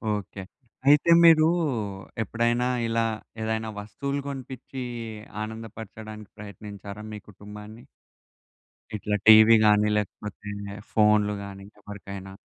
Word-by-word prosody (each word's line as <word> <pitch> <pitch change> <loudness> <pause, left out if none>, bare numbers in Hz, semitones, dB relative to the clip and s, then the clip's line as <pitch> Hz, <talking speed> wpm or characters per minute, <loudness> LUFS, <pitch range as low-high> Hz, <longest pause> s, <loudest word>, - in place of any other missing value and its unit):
Okay. 100 -1 -7 0.4
అయితే 150 +4 +6
మీరు 160 -1 +7 0.8
ఎప్పుడైనా 120 +2 0 0.2
ఇలా 115 0 +1 0.4
ఏదైనా 110 0 -2
వస్తువులు 140 +8 -4
కొనిపిచ్చి 130 -1 -7 0.6
ఆనందపరచడానికి 110 -1 -9
ప్రయత్నించారా 100 0 -9
మీ 105 - -6
కుటుంబాన్ని? 105 +3 -11 1.1
ఇట్లా 105 0 -2
టీవీ 110 +1 +9
గాని, 105 0 +5
లేకపోతే 105 0 -5 0.4
ఫోనులు 105 -1 +3
గాని 100 -1 -9 0.2
ఎవరికైనా? 100 -1 -9
105 Hz, 90 wpm, -26 LUFS, 105-115 Hz, 1.1 s, టీవీ